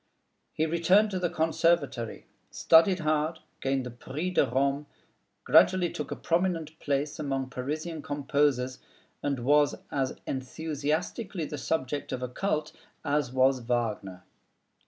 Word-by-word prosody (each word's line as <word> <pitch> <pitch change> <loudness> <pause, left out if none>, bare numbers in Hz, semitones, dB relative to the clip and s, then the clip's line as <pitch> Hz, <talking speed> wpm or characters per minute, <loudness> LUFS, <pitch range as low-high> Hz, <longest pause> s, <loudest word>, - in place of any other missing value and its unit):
He 155 - 0
returned 180 +6 +3
to 185 - -1
the 175 -1 0
Conservatory, 160 -7 0 0.2
studied 170 +3 +4
hard, 155 +1 0 0.2
gained 135 -1 0
the 125 - -6
Prix 145 +9 -4
de 160 - +3
Rome, 140 +3 0 0.6
gradually 180 -2 +5
took 150 -2 -5
a - - -3
prominent 165 -3 -1
place 145 +1 -1
among 135 -3 -2
Parisian 155 +5 -4
composers, 140 -3 0 0.4
and 135 -4 -2
was 145 +1 +4 0.2
as 135 -2 -1
enthusiastically 155 - -3
the 150 -1 -6
subject 145 -1 -2
of 125 - -3
a - - -1
cult 155 +3 -1 0.3
as 145 -3 0
was 130 0 +3
Wagner. 110 -6 -2
145 Hz, 130 wpm, -28 LUFS, 130-160 Hz, 0.6 s, gradually